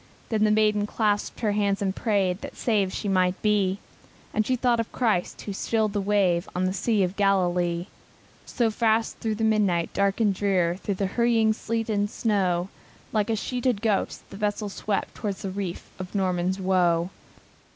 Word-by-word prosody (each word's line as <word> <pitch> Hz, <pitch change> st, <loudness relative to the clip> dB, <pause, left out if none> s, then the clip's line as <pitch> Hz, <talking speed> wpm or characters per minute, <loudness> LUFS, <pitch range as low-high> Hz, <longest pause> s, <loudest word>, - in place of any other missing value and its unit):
Then 215 Hz, -2 st, +2 dB
the -, -, +3 dB
maiden 210 Hz, -1 st, +3 dB
clasped 210 Hz, -1 st, -1 dB
her 215 Hz, -3 st, +2 dB
hands 200 Hz, -1 st, +1 dB
and 195 Hz, -1 st, -1 dB
prayed 195 Hz, -4 st, 0 dB
That -, -, -8 dB
saved 205 Hz, -5 st, +1 dB
she 205 Hz, -, -4 dB
might 185 Hz, -1 st, +2 dB
be; 200 Hz, -3 st, +2 dB, 0.6 s
And 215 Hz, -, +1 dB
she 255 Hz, -, +2 dB
thought 245 Hz, -1 st, +2 dB
of 230 Hz, -, -2 dB
Christ, 220 Hz, -8 st, 0 dB
who 200 Hz, -, -4 dB
stilled 215 Hz, +1 st, 0 dB
the 205 Hz, -, 0 dB
wave, 195 Hz, -3 st, +1 dB
On 180 Hz, +1 st, +1 dB
the 185 Hz, +1 st, -1 dB
Lake 215 Hz, -4 st, +3 dB
of 180 Hz, +2 st, -5 dB
Galilee. 180 Hz, -3 st, +1 dB, 0.7 s
And 225 Hz, -2 st, +3 dB
fast 225 Hz, 0 st, +1 dB
through 220 Hz, -1 st, -1 dB
the 220 Hz, -, -3 dB
midnight 205 Hz, -6 st, +2 dB
dark 200 Hz, +1 st, +1 dB
and 210 Hz, -3 st, +3 dB
drear 185 Hz, -3 st, +1 dB
Through 200 Hz, 0 st, -3 dB
the 195 Hz, -, -1 dB
whistling 225 Hz, -2 st, +4 dB
sleet 225 Hz, +1 st, -3 dB
and 205 Hz, -2 st, 0 dB
snow, 190 Hz, -5 st, 0 dB, 0.4 s
Like 215 Hz, 0 st, +1 dB
a 225 Hz, -, +2 dB
sheeted 245 Hz, -1 st, -1 dB
ghost, 210 Hz, -4 st, -1 dB
the 195 Hz, -, -8 dB
vessel 210 Hz, 0 st, -1 dB
swept 200 Hz, 0 st, -2 dB
Towards 200 Hz, -3 st, -4 dB
the 195 Hz, -, -3 dB
reef 185 Hz, -3 st, -5 dB
of 185 Hz, +2 st, -7 dB
Norman's 185 Hz, -1 st, 0 dB
Woe. 180 Hz, -2 st, +2 dB
205 Hz, 180 wpm, -26 LUFS, 185-220 Hz, 0.7 s, whistling